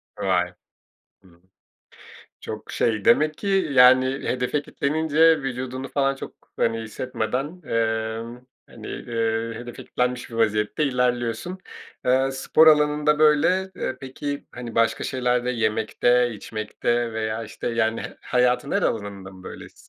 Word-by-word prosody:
Vay. - - 0 0.7
Hımm. 85 -2 -22 1.0
Çok - - -7
şey 110 -3 0
demek 155 +5 +4
ki, 200 - -5 0.2
yani, 130 0 +7
hedefe 130 +1 -1
kitlenince 160 +2 +2
vücudunu, 130 0 -4
falan, 135 0 0
çok, - - -8 0.2
hani, 115 0 +1
hissetmeden, 125 +3 -3 0.2
emm, 115 0 -2 0.3
hani, - - -11
ııı, 115 0 -2
hedefe 120 0 -8
kitlenmiş 125 0 -2
bir 115 - -9
vaziyette 105 +5 +1
ilerliyorsun. 125 +5 -1 0.5
Eee, 130 +1 +3
spor 155 +4 +4
alanında 150 0 +4
böyle. 180 +5 +3
Eee, - - -3
peki, 140 +2 -5
hani, 120 -2 -8
başka 115 0 +2
şeylerde, 125 -1 0
yemekte, 115 +2 +2
içmekte 110 +2 -2
veya, 110 0 -2
işte, 110 - -6
yani, 115 -1 0
h - - -8
hayatın 125 +3 +1
her 200 - +1
alanında 100 -3 -3
mı 95 0 -14
böylesin? - - -10
125 Hz, 125 wpm, -24 LUFS, 115-135 Hz, 1.0 s, yani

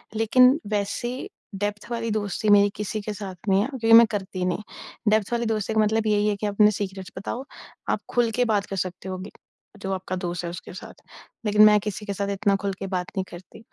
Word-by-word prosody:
लेकिन 250 +5 +5
वैसी 210 +5 -2 0.3
डेप्थ 205 +2 -3
वाली 230 -1 -2
दोस्ती 210 0 -1
मेरी 205 0 +6
किसी 210 +1 -3
के 210 +1 -4
साथ 195 -2 -7
नहीं 195 +1 +4
है, 220 - 0
क्योंकि 245 -5 -1
मैं 230 +1 +10
करती 190 -3 -3
नहीं। 180 +1 -1 0.5
डेप्थ 215 0 +2
वाली 235 0 0
दोस्ती 220 -1 -1
का 220 - +2
मतलब 220 +1 +1
यही 210 0 +2
है 210 - +1
कि 210 - -2
अपने 210 +1 +4
सीक्रेट्स 190 -2 -5
बताओ। 235 +6 -4 0.5
आप - - +1
खुल 240 -2 +2
के 245 +3 +1
बात 210 -3 +1
कर 195 - -5
सकते 185 0 -4
होंगे, 185 +2 -6 0.5
जो 195 0 -2
आपका 185 0 -4
दोस्त 175 -2 -4
है, 170 - -3
उसके 175 +1 -8
साथ। - - -11 0.4
लेकिन 210 0 +4
मैं 210 0 +6
किसी 210 0 -5
के 200 - -3
साथ 200 +1 -2
इतना 200 0 +1
खुल 200 -1 -1
के 195 - -4
बात 180 -1 -2
नहीं 190 - +1
करती, 180 +5 -12
205 Hz, 220 wpm, -24 LUFS, 190-220 Hz, 0.5 s, मैं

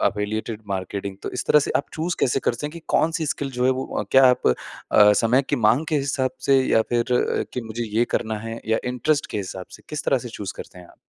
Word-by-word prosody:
Affiliated 105 +1 -1
marketing. 95 0 -4
तो - - -4
इस - - -2
तरह 150 - +6
से - - -2
आप 140 - -2
चूज़ 170 +2 -2
कैसे 135 +2 +2
करते 120 +4 -1
हैं - - -6
कि 170 - -9
कौन-सी 160 0 +2
स्किल 140 -1 -2
जो 125 -1 -2
है 130 - +5
वो - - -3
क्या 135 0 +7
आप 125 -1 +2 0.5
अ, 105 0 +7
समय 115 +6 +3
की 145 - +1
माँग 125 +8 +3
के 155 - +1
हिसाब 135 -2 0 0.2
से 135 -1 +5
या 115 -3 +3
फिर 120 -1 +2 0.5
कि 125 - -3
मुझे 115 +1 -5
ये 120 - +4
करना 110 -1 -1
है 115 +1 -6
या 110 0 +2
इंटरेस्ट 140 +4 0
के - - -3
हिसाब 95 -1 -6
से, - - -13
किस 150 -1 -4
तरह 135 - +2
से 120 - -8
चूज़ 100 -3 -6
करते 90 - -10
हैं 90 - -12
आप? - - -19
120 Hz, 245 wpm, -23 LUFS, 110-135 Hz, 0.5 s, क्या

